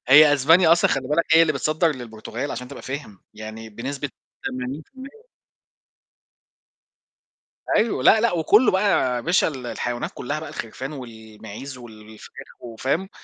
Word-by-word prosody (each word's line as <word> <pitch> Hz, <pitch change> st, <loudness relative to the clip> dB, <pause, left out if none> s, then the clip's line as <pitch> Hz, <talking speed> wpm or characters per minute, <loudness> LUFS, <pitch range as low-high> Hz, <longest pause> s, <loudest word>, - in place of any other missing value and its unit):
هي 145 Hz, +2 st, +8 dB
أسبانيا 160 Hz, +5 st, +5 dB
أصلًا 170 Hz, -, +3 dB
خلّي 135 Hz, -2 st, -1 dB
بالك 160 Hz, +3 st, +2 dB
هي 165 Hz, -, +8 dB
اللي 155 Hz, -2 st, +2 dB
بتصدّر 155 Hz, +4 st, +1 dB
للبرتغال 120 Hz, +2 st, -6 dB
عشان 125 Hz, -, -6 dB
تبقى -, -, -10 dB
فاهم، 130 Hz, -8 st, -7 dB
يعني 110 Hz, +1 st, -8 dB
بنسبة 135 Hz, +6 st, -5 dB, 0.3 s
80%. 260 Hz, -, -7 dB, 2.4 s
أيوة، 225 Hz, 0 st, +1 dB
لا، 220 Hz, -, +6 dB
لأ، 235 Hz, -, +2 dB
وكلّه 205 Hz, +8 st, +4 dB
بقى 190 Hz, +1 st, +1 dB, 0.3 s
يا 120 Hz, -, -1 dB
باشا 175 Hz, +8 st, +2 dB
ال 130 Hz, -5 st, -6 dB
الحيوانات 120 Hz, 0 st, -3 dB
كلّها 145 Hz, +5 st, -4 dB
بقى 155 Hz, -1 st, -8 dB
الخرفان 130 Hz, +6 st, -6 dB
والمعيز 110 Hz, 0 st, -10 dB
والفراخ 110 Hz, -2 st, -13 dB
وفاهم، 135 Hz, -, -3 dB
135 Hz, 135 wpm, -23 LUFS, 120-160 Hz, 2.4 s, هي